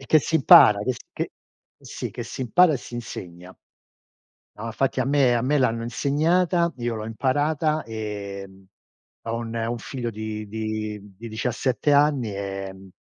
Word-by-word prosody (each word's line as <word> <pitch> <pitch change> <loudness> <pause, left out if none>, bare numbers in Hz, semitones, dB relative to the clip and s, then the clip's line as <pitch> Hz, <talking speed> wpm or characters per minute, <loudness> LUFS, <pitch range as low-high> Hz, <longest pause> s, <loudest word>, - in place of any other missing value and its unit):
e 135 - -12
che 155 - +6
si 160 - -4
impara, 105 -7 +8
che 130 - -1
s - - -10
che - - -3 0.5
sì, - - -6
che - - -6
si - - -8
impara 175 +7 +5
e - - 0
si 120 - -10
insegna. 90 -6 -8 1.0
No, 110 - -6
infatti, 135 +4 -1
a - - +1
me 135 -3 +3
a 115 - 0
me 145 +3 +2
l'hanno 115 -3 +1
insegnata, 170 +7 +1
io 120 -1 -2
l'ho 110 - -5
imparata. 145 +6 0
Ehm, 100 -3 -7 0.6
ho 115 0 -3
un 115 -1 -5
un 115 +1 -2
figlio 120 0 -5
di 110 0 -5
di 110 -1 -3 0.2
di 115 +3 -8
17 125 +5 0
anni, 140 -7 +3
ehm 95 -1 -6
115 Hz, 165 wpm, -24 LUFS, 105-140 Hz, 1.0 s, impara